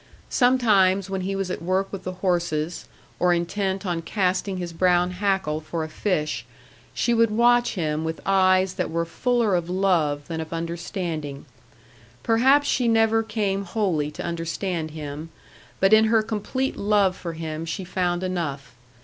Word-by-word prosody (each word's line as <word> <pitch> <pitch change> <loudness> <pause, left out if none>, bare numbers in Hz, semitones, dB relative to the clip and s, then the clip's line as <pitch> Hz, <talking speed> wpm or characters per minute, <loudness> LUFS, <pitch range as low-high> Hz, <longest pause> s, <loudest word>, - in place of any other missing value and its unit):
Sometimes 200 -7 +3
when 190 -1 -2
he 195 +2 -2
was 195 -2 -2
at - - -4
work 185 +3 -1
with 195 - -6
their 185 - -3
horses, 175 -3 -1 0.3
or 180 0 +4
intent 190 +3 -2
on 175 -2 -1
casting 185 +1 -1
his 175 -2 -5
brown 180 +1 +2
hackle 180 -5 -1
for 160 +1 -4
a 155 - -5
fish, 155 -2 -1 0.5
she 240 - 0
would 230 -1 +4
watch 240 +2 +3
him 155 -3 -1
with 160 0 -3
eyes 185 -1 +3
that 185 -1 -2
were 170 +1 -1
fuller 235 +4 0
of 175 -1 0
love 170 -6 +1
than 160 -1 -3
of 160 - -8
understanding. 165 -3 -4 0.8
Perhaps 265 +6 +4
she 250 -2 +1
never 225 0 +3
came 210 -3 -1
wholly 180 -7 -1
to 150 - -7
understand 170 0 -3
him; 150 0 -7 0.5
but 195 +2 +4
in 220 0 +7
her 220 0 +3
complete 230 +5 -2
love 200 -2 +2
for 170 -3 -6
him 160 -1 -5
she 165 +3 -4
found 180 0 -1
enough. 145 -8 -3
185 Hz, 160 wpm, -24 LUFS, 165-205 Hz, 0.8 s, in